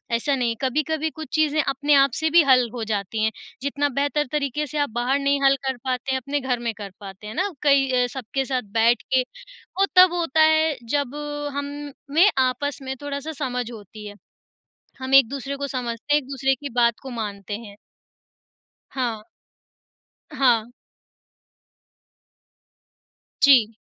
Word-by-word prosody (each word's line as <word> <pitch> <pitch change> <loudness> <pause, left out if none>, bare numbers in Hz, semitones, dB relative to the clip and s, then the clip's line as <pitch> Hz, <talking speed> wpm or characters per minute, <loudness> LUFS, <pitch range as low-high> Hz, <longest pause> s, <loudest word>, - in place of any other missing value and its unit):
ऐसा 275 +4 0
नहीं 235 -3 0
कभी-कभी 305 +4 0
कुछ 315 0 -9
चीज़ें 310 0 +2
अपने 285 +2 +1
आप 275 -1 +5
से 315 0 +1
भी 340 +2 +6
हल 250 -2 +5
हो 235 - -4
जाती 215 0 -2
हैं, 220 - +2 0.3
जितना 285 +1 0
बेहतर 290 +1 0
तरीके 295 0 -1
से 300 - -6
आप 290 -3 +1
बाहर 255 +3 +1
नहीं 280 0 +1
हल 275 0 +5
कर 265 - -1
पाते 255 +1 -2
हैं, 265 - +1
अपने 285 +3 -2
घर 255 -2 -1
में 225 - 0
कर 200 -2 -7
पाते 195 +1 -10
हैं 215 - -6
ना, 385 +3 0
कई 275 -2 +4
अ, - - 0
सबके 265 +1 -3
साथ 255 0 -1 0.2
बैठ 235 0 +4
के 260 - +5 0.6
वो 395 - +5
तब 365 -1 +8
होता 330 -3 +1
है 315 -1 +4
जब 285 0 -1 0.4
हम 285 0 -3 0.4
में 375 +5 +7 0.2
आपस 285 +1 -4
में 265 0 -4
थोड़ा-सा 285 +2 -4
समझ 245 -2 -3
होती 210 -1 -10
है। 205 - -10 0.9
हम 260 +1 -1
एक-दूसरे 275 +1 +3
को 280 - -3
समझते 250 +2 -2
हैं, 295 - +4
एक-दूसरे 270 0 0
की 285 +2 -7
बात 235 -1 +3
को 265 - -8
मानते 205 -1 -5
हैं। 200 - -12 1.2
हाँ। 240 -5 -3 1.1
हाँ। 240 -3 +2 2.7
जी। 250 -6 +6
270 Hz, 160 wpm, -23 LUFS, 235-290 Hz, 2.7 s, तब